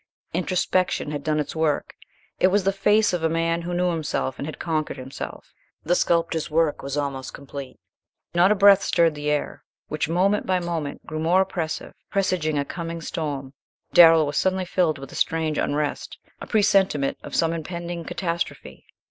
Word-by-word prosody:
Introspection 180 Hz, -2 st, 0 dB
had 145 Hz, -1 st, -4 dB
done 155 Hz, 0 st, 0 dB
its 150 Hz, -, -3 dB
work. 160 Hz, -2 st, 0 dB, 0.5 s
It -, -, +5 dB
was 195 Hz, +1 st, +2 dB
the 195 Hz, -, +2 dB
face 210 Hz, +2 st, +3 dB
of 175 Hz, -, -1 dB
a 160 Hz, -, +2 dB
man 165 Hz, +1 st, 0 dB
who 175 Hz, +1 st, -4 dB
knew 180 Hz, 0 st, +1 dB
himself 155 Hz, -5 st, -2 dB
and 140 Hz, -, -4 dB
had 155 Hz, -, -6 dB
conquered 155 Hz, -3 st, -2 dB
himself. 130 Hz, +1 st, -8 dB, 0.3 s
The 170 Hz, -, +1 dB
sculptor's 165 Hz, -2 st, +1 dB
work 160 Hz, -1 st, +1 dB
was 140 Hz, +1 st, -4 dB
almost 140 Hz, -2 st, -3 dB
complete. 140 Hz, -2 st, -9 dB, 0.5 s
Not 175 Hz, +3 st, +5 dB
a -, -, +4 dB
breath 200 Hz, 0 st, +7 dB
stirred 170 Hz, -4 st, +2 dB
the 150 Hz, 0 st, -3 dB
air, 150 Hz, 0 st, -2 dB, 0.3 s
which 155 Hz, 0 st, -2 dB
moment 195 Hz, +5 st, +1 dB
by 185 Hz, -1 st, +2 dB
moment 165 Hz, -4 st, -4 dB
grew 155 Hz, 0 st, -5 dB
more 170 Hz, +4 st, +3 dB
oppressive, 175 Hz, -4 st, -3 dB, 0.2 s
presaging 180 Hz, -6 st, 0 dB
a 140 Hz, -, 0 dB
coming 170 Hz, 0 st, -5 dB
storm. 145 Hz, -4 st, -4 dB, 0.4 s
Darrell 165 Hz, -2 st, +8 dB
was 145 Hz, -, -3 dB
suddenly 190 Hz, 0 st, +1 dB
filled 170 Hz, -4 st, +1 dB
with 135 Hz, 0 st, -10 dB
a -, -, -10 dB
strange 160 Hz, -2 st, 0 dB
unrest 145 Hz, 0 st, -2 dB, 0.2 s
a -, -, -8 dB
presentiment 195 Hz, -9 st, +2 dB
of -, -, -7 dB
some 165 Hz, 0 st, +2 dB
impending 170 Hz, +1 st, -5 dB
catastrophe. 170 Hz, 0 st, -4 dB
165 Hz, 175 wpm, -24 LUFS, 150-180 Hz, 0.5 s, Darrell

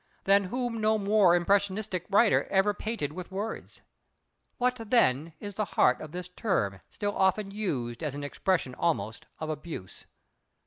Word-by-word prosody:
Than 200 Hz, 0 st, +4 dB
whom 240 Hz, +2 st, -2 dB
no 215 Hz, 0 st, +3 dB
more 200 Hz, -3 st, +4 dB
impressionistic 195 Hz, 0 st, 0 dB
writer 205 Hz, +2 st, +4 dB
ever 195 Hz, +1 st, +2 dB
painted 205 Hz, -9 st, -3 dB
with 180 Hz, +1 st, -7 dB
words. 205 Hz, +4 st, -5 dB, 0.8 s
What 250 Hz, 0 st, +1 dB
then 160 Hz, -, +3 dB
is 205 Hz, 0 st, -6 dB
the 215 Hz, +2 st, -1 dB
heart 125 Hz, -, +4 dB
of 155 Hz, -, -8 dB
this 180 Hz, +1 st, -6 dB
term 175 Hz, -, -1 dB
still 205 Hz, 0 st, -3 dB
often 195 Hz, +1 st, +1 dB
used 140 Hz, -, -3 dB
as 150 Hz, -4 st, -3 dB
an 145 Hz, -, -5 dB
expression 145 Hz, -1 st, -1 dB
almost 115 Hz, -9 st, -2 dB
of 155 Hz, 0 st, -3 dB
abuse? 150 Hz, -, -8 dB
190 Hz, 150 wpm, -28 LUFS, 155-210 Hz, 0.8 s, Than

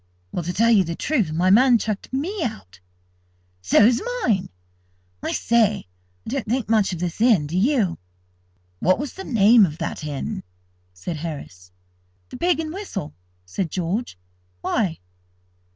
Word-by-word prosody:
"Well, -, -, -2 dB
to 180 Hz, -, -1 dB
tell 230 Hz, +5 st, +3 dB
you 205 Hz, -4 st, +5 dB
the 170 Hz, -1 st, -4 dB
truth, 225 Hz, -, 0 dB
my 175 Hz, +4 st, +2 dB
man's 240 Hz, +1 st, +5 dB
chucked 210 Hz, -2 st, -4 dB
me 335 Hz, +10 st, -2 dB
out." 95 Hz, -, -6 dB, 0.8 s
"So's 210 Hz, -, +4 dB, 0.2 s
mine! 195 Hz, -5 st, +1 dB, 0.7 s
I -, -, -2 dB
say, 225 Hz, -3 st, +2 dB, 0.4 s
I -, -, -6 dB
don't 260 Hz, -1 st, -3 dB
think 245 Hz, +2 st, -1 dB
much 215 Hz, -3 st, +2 dB
of 180 Hz, -, -3 dB
this 175 Hz, +3 st, -3 dB
inn, 225 Hz, -11 st, +4 dB
do 155 Hz, +4 st, -5 dB
you?" 210 Hz, -, +2 dB, 0.8 s
"What 185 Hz, -, +3 dB
was 285 Hz, +2 st, -5 dB
the 385 Hz, -, -8 dB
name 225 Hz, -, +5 dB
of 155 Hz, -5 st, 0 dB
that 165 Hz, -2 st, -4 dB
inn?" 145 Hz, -3 st, -4 dB, 0.5 s
said 95 Hz, -, -6 dB
Harris. 140 Hz, -, -7 dB, 0.6 s
"The -, -, -8 dB
Pig 350 Hz, -1 st, +1 dB
and 315 Hz, -1 st, -3 dB
Whistle," 225 Hz, -, -5 dB, 0.3 s
said 160 Hz, -, -3 dB
George. 180 Hz, -, -3 dB, 0.4 s
"Why?" 190 Hz, -, 0 dB
200 Hz, 150 wpm, -23 LUFS, 165-240 Hz, 0.8 s, you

